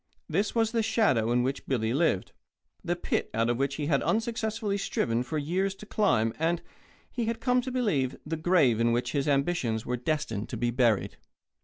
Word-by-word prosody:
This 205 Hz, +3 st, 0 dB
was 225 Hz, -1 st, +2 dB
the 230 Hz, -1 st, +1 dB
shadow 210 Hz, -, +2 dB
in 120 Hz, 0 st, +3 dB
which 135 Hz, +2 st, -3 dB
Billy 115 Hz, -4 st, 0 dB
lived, 140 Hz, -, +1 dB, 0.5 s
the -, -, 0 dB
pit -, -, -2 dB
out 115 Hz, +1 st, +2 dB
of 120 Hz, -, -1 dB
which 140 Hz, +1 st, 0 dB
he 150 Hz, -, -3 dB
had 145 Hz, -2 st, +2 dB
unsuccessfully 220 Hz, -2 st, -1 dB
striven 115 Hz, -10 st, 0 dB
for 155 Hz, +5 st, -3 dB
years 185 Hz, +6 st, -1 dB
to 210 Hz, -, -11 dB
climb 115 Hz, -, +1 dB
and, 165 Hz, +1 st, +1 dB, 0.5 s
he 240 Hz, -2 st, -2 dB
had 230 Hz, 0 st, -2 dB
come 250 Hz, +1 st, +2 dB
to 260 Hz, +1 st, -5 dB
believe, 180 Hz, -, 0 dB
the 160 Hz, +2 st, -2 dB
grave 155 Hz, -8 st, +3 dB
in 115 Hz, 0 st, +3 dB
which 120 Hz, +1 st, 0 dB
his 140 Hz, -1 st, -1 dB
ambitions 140 Hz, -6 st, 0 dB
were 125 Hz, -, -1 dB
destined 125 Hz, -5 st, -2 dB
to 120 Hz, -, -4 dB
be 120 Hz, +1 st, 0 dB
buried. 120 Hz, -4 st, +1 dB
150 Hz, 195 wpm, -28 LUFS, -, 0.5 s, in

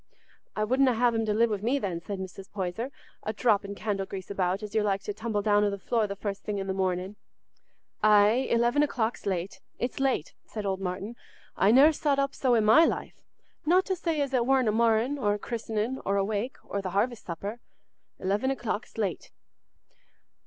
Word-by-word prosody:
"I 215 Hz, -, 0 dB
wouldna 255 Hz, +2 st, +3 dB
have 240 Hz, +1 st, +3 dB
him 225 Hz, -1 st, 0 dB
to 210 Hz, -, +2 dB
live 230 Hz, +1 st, +3 dB
wi' 210 Hz, -, 0 dB
me, 235 Hz, +8 st, 0 dB
then," 185 Hz, -9 st, -3 dB
said 200 Hz, +3 st, -5 dB
Mrs. 190 Hz, 0 st, -8 dB
Poyser, 200 Hz, +5 st, -3 dB, 0.3 s
"a 215 Hz, -, -3 dB
dropping 205 Hz, -3 st, +1 dB
candle 200 Hz, -2 st, -2 dB
grease 190 Hz, 0 st, -7 dB
about, 190 Hz, +1 st, -1 dB
as 210 Hz, -1 st, -7 dB
you're 220 Hz, -1 st, +2 dB
like 195 Hz, -1 st, 0 dB
to 205 Hz, -, -3 dB
tumble 210 Hz, -1 st, -2 dB
down 205 Hz, -1 st, +4 dB
o' 205 Hz, -, +3 dB
the 200 Hz, -, -3 dB
floor 220 Hz, +2 st, 0 dB
the 200 Hz, -, -5 dB
first 200 Hz, 0 st, -4 dB
thing 205 Hz, -1 st, -3 dB
i' -, -, -2 dB
the 195 Hz, 0 st, -2 dB
morning." 190 Hz, +1 st, -2 dB, 0.8 s
"Aye, 215 Hz, +4 st, +5 dB
eleven 240 Hz, +5 st, +3 dB
o'clock's 240 Hz, -7 st, -1 dB
late—it's 195 Hz, +7 st, -4 dB
late," 270 Hz, -, 0 dB
said 215 Hz, -2 st, -5 dB
old 190 Hz, -1 st, -1 dB
Martin. 195 Hz, +5 st, -4 dB, 0.4 s
"I 195 Hz, -, +3 dB
ne'er 270 Hz, +7 st, +7 dB
sot 290 Hz, -2 st, 0 dB
up 275 Hz, 0 st, 0 dB
so 255 Hz, -3 st, +2 dB
i' -, -, +4 dB
my 220 Hz, +9 st, +7 dB
life, -, -, -2 dB, 0.4 s
not 360 Hz, +4 st, +4 dB
to 380 Hz, -, 0 dB
say 330 Hz, -3 st, -1 dB
as 275 Hz, -1 st, -2 dB
it 250 Hz, -2 st, +3 dB
warna 260 Hz, -4 st, +3 dB
a -, -, -4 dB
marr'in', 230 Hz, +5 st, +2 dB
or 205 Hz, -5 st, +1 dB
a -, -, -3 dB
christenin', 225 Hz, +2 st, -3 dB
or 200 Hz, 0 st, 0 dB
a 195 Hz, -, +2 dB
wake, 215 Hz, +5 st, -3 dB
or 200 Hz, -, -3 dB
th' -, -, -17 dB
harvest 210 Hz, +5 st, -1 dB
supper. 200 Hz, +7 st, -5 dB, 0.6 s
Eleven 200 Hz, +7 st, 0 dB
o'clock's 240 Hz, -5 st, -3 dB
late." 200 Hz, -5 st, -2 dB
215 Hz, 200 wpm, -28 LUFS, 200-245 Hz, 0.8 s, ne'er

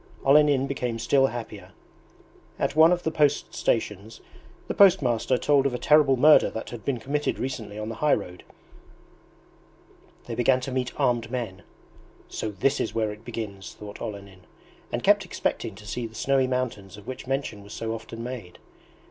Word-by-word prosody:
Olenin 140 Hz, -1 st, +5 dB
became 125 Hz, -4 st, -3 dB
still 135 Hz, +4 st, +3 dB
happier. 105 Hz, -6 st, -8 dB, 0.8 s
At -, -, -1 dB
one 160 Hz, +2 st, +7 dB
of 175 Hz, 0 st, +1 dB
the 160 Hz, -, 0 dB
post 145 Hz, -2 st, +1 dB
stations 110 Hz, -1 st, -2 dB, 0.5 s
the -, -, -2 dB
post 195 Hz, -7 st, +6 dB
master 120 Hz, +1 st, +1 dB
told 140 Hz, 0 st, +3 dB
of 125 Hz, -, -3 dB
a -, -, -1 dB
terrible 145 Hz, -1 st, +4 dB
murder 150 Hz, +4 st, +6 dB
that 110 Hz, -, -7 dB
had 120 Hz, -3 st, -8 dB
been 130 Hz, -4 st, -1 dB
committed 145 Hz, +4 st, -1 dB
recently 110 Hz, -5 st, -5 dB
on 110 Hz, 0 st, -4 dB
the -, -, -4 dB
high 150 Hz, -1 st, +4 dB
road. 90 Hz, 0 st, -8 dB, 1.8 s
They -, -, -6 dB
began 125 Hz, +1 st, +3 dB
to 130 Hz, -, -5 dB
meet 130 Hz, -1 st, -1 dB
armed 120 Hz, -2 st, +1 dB
men. 115 Hz, -7 st, -4 dB, 0.7 s
"So 110 Hz, -, -4 dB
this 120 Hz, +8 st, 0 dB
is -, -, -2 dB
where 110 Hz, -2 st, 0 dB
it 105 Hz, +1 st, -11 dB
begins!" 110 Hz, -5 st, -6 dB
thought 105 Hz, -1 st, -10 dB
Olenin, 100 Hz, -3 st, -8 dB, 0.4 s
and -, -, -3 dB
kept -, -, +4 dB
expecting 110 Hz, -, -3 dB
to 105 Hz, -, -13 dB
see 115 Hz, +1 st, -3 dB
the 110 Hz, -, -16 dB
snowy 135 Hz, 0 st, +2 dB
mountains 115 Hz, -7 st, -3 dB
of 105 Hz, -, -13 dB
which 130 Hz, 0 st, -7 dB
mention 135 Hz, -6 st, -2 dB
was 100 Hz, +1 st, -11 dB
so 115 Hz, 0 st, -3 dB
often 115 Hz, 0 st, -7 dB
made. 120 Hz, -8 st, -7 dB
120 Hz, 175 wpm, -26 LUFS, 105-135 Hz, 1.8 s, one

